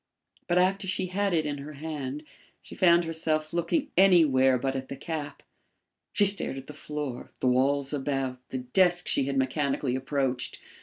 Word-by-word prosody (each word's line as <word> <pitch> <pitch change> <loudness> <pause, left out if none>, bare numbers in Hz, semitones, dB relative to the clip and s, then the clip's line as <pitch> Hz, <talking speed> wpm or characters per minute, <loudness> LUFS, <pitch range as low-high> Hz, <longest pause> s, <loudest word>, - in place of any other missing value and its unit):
But 175 - +2
after 190 +2 +2
she 185 0 -1
had 200 0 +1
it 160 -3 +1
in 145 -1 -3
her 150 +2 -8
hand 150 -1 -5 0.4
she - - -12
found 170 -1 +4
herself 160 -1 -2
looking 175 - 0
anywhere 150 -9 +5
but 135 +2 -2
at 130 0 -5
the - - -5
cap. 145 0 -6 0.7
She 205 - +3
stared 195 -8 0
at 135 - -8
the 150 - -10
floor, 145 -5 -6
the - - -2
walls 135 +3 +2
about, 135 -2 -2
the 130 - -3
desk 175 +8 +2
she 135 - +2
had 135 0 -2
mechanically 135 -1 0
approached. 130 -1 -1
145 Hz, 170 wpm, -27 LUFS, 135-170 Hz, 0.7 s, anywhere